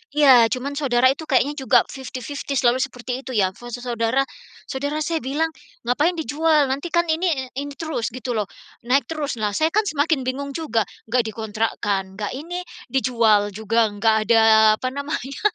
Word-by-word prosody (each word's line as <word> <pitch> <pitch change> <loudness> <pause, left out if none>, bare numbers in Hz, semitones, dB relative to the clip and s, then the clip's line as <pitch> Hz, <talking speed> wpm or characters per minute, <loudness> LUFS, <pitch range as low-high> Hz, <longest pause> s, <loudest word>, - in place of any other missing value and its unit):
iya, 290 -3 +7 0.2
cuman 270 +3 -2
saudara 255 -3 +3
itu 300 +4 -5
kayaknya 285 +1 +2
juga 260 -3 +4
fifty-fifty 265 +1 -6
selalu 240 0 +3
seperti 250 -1 -5
itu 260 - -7
ya. 190 -3 +3
Fase 240 0 -8
saudara 235 +1 +1 0.5
saudara 285 +3 -3
saya 325 +2 -1
bilang, 300 +5 0 0.4
ngapain 295 +8 +2
dijual? 310 -2 +2
Nantikan 340 +5 0
ini, 320 -5 0
ini 285 +1 -4
terus 310 -9 -3
gitu 255 0 -5
loh, 210 -2 -1 0.4
naik 275 +3 +3
terus. 300 -5 -3
Nah 210 -1 0
saya 315 - +3
kan 430 - +4
semakin 300 -1 +1
bingung 280 +2 -3
juga, 285 -9 0 0.3
nggak 250 -1 +3
dikontrakkan, 215 -2 -2
nggak 205 0 -4
ini, 340 +6 -5 0.3
dijual 230 -6 +3
juga 220 +2 +1
nggak 220 +2 +3
ada, 230 -1 +5 0.4
apa 255 - -2
namanya, 280 -1 -5
265 Hz, 160 wpm, -22 LUFS, 235-295 Hz, 0.5 s, iya